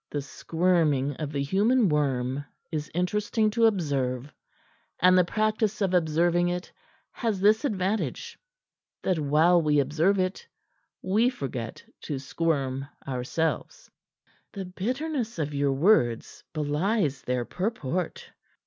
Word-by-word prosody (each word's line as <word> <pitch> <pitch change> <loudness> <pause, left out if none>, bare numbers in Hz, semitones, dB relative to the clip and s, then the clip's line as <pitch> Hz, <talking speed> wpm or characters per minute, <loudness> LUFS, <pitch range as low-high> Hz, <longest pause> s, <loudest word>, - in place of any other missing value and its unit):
The 145 -1 -3
squirming 155 -3 +1
of 150 -2 -4
the 140 -2 -1
human 210 - +3
worm 140 -3 0 0.3
is 150 -2 -3
interesting 210 +5 0
to 230 +1 +4
observe, 140 - -1 0.7
and 185 0 +6
the 180 - +6
practice 215 +2 0
of 195 -3 0
observing 175 +1 +2
it 180 0 -4 0.4
has 225 -5 -2
this 215 +6 +4
advantage, 205 -3 -2 0.6
that 185 -4 +1
while 155 +4 +4
we 150 -2 +3
observe 155 +8 +2
it 185 0 -2 0.6
we 215 +6 +3
forget 130 - -5 0.2
to 145 - -3
squirm 135 -1 -1 0.2
ourselves." 160 - -3 0.6
"The 195 -3 -5
bitterness 245 - -3
of 150 -2 -2
your 140 -1 +1
words 135 - +2
belies 150 - 0
their 125 -1 -2
purport." 180 - -3
170 Hz, 120 wpm, -27 LUFS, 145-200 Hz, 0.7 s, and